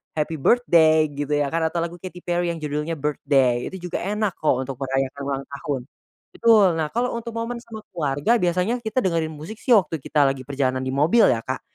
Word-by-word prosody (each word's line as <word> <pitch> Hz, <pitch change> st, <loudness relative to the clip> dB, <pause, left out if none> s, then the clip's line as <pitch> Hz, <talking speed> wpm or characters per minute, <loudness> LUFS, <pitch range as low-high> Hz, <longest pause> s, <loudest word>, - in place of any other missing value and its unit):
Happy 155 Hz, +1 st, -1 dB
Birthday 160 Hz, -, +4 dB
gitu 145 Hz, +1 st, -4 dB
ya 145 Hz, -1 st, +1 dB
kan 165 Hz, -1 st, +1 dB
atau 170 Hz, +1 st, -3 dB
lagu 170 Hz, +1 st, -5 dB
Katy 180 Hz, -1 st, -9 dB
Perry 175 Hz, 0 st, 0 dB
yang 165 Hz, -, -8 dB
judulnya 150 Hz, +2 st, -2 dB
"Birthday" 135 Hz, -4 st, +1 dB
itu 180 Hz, -2 st, -7 dB
juga -, -, -1 dB
enak 210 Hz, +1 st, -1 dB
kok 130 Hz, -4 st, +1 dB
untuk 135 Hz, 0 st, -6 dB
merayakan 135 Hz, +1 st, -2 dB
ulang 135 Hz, -1 st, -3 dB
tahun. 140 Hz, -2 st, -3 dB, 0.5 s
Betul 220 Hz, -4 st, +5 dB
nah 155 Hz, -1 st, 0 dB
kalau 245 Hz, +2 st, 0 dB
untuk 235 Hz, 0 st, -6 dB
momen 230 Hz, +1 st, -3 dB
sama 220 Hz, -2 st, -9 dB
keluarga 150 Hz, +7 st, +1 dB
biasanya 180 Hz, +6 st, 0 dB
kita 250 Hz, +4 st, 0 dB
dengerin 165 Hz, -4 st, -1 dB
musik 160 Hz, +9 st, -9 dB
sih 245 Hz, +1 st, +2 dB
waktu 170 Hz, -6 st, +3 dB
kita 145 Hz, -1 st, +2 dB
lagi 130 Hz, -2 st, -5 dB
perjalanan 130 Hz, -1 st, -1 dB
di -, -, -2 dB
mobil 160 Hz, +12 st, +4 dB
ya 115 Hz, -, 0 dB
Kak, 130 Hz, +2 st, -4 dB
160 Hz, 205 wpm, -23 LUFS, 140-190 Hz, 0.5 s, Betul